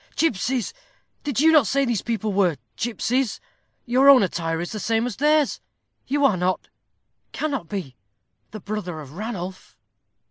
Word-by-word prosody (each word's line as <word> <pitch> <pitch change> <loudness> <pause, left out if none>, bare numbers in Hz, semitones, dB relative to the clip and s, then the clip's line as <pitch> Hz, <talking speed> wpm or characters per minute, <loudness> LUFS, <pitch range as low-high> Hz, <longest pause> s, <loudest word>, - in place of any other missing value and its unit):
"Gipsies! 255 - 0 0.5
did 285 -5 -1
you 320 +2 +6
not 300 -8 +5
say 275 +7 +2
these 240 -5 0
people 220 -3 -2
were 185 -6 +2 0.2
gipsies? 240 +1 -1 0.5
Your 260 +3 +5
own 265 -5 +8
attire 165 -3 -2
is 175 - -4
the 215 - -4
same 225 +3 +1
as 245 -4 -4
theirs. 300 0 +2 0.5
You 285 +2 +2
are 210 -9 +3
not, 180 +1 -1 0.6
cannot 275 - -3
be, 175 -11 -5 0.5
the 215 - -8
brother 195 -5 -5
of 140 -3 -10
Ranulph." 190 -2 -6
225 Hz, 150 wpm, -23 LUFS, 185-270 Hz, 0.6 s, own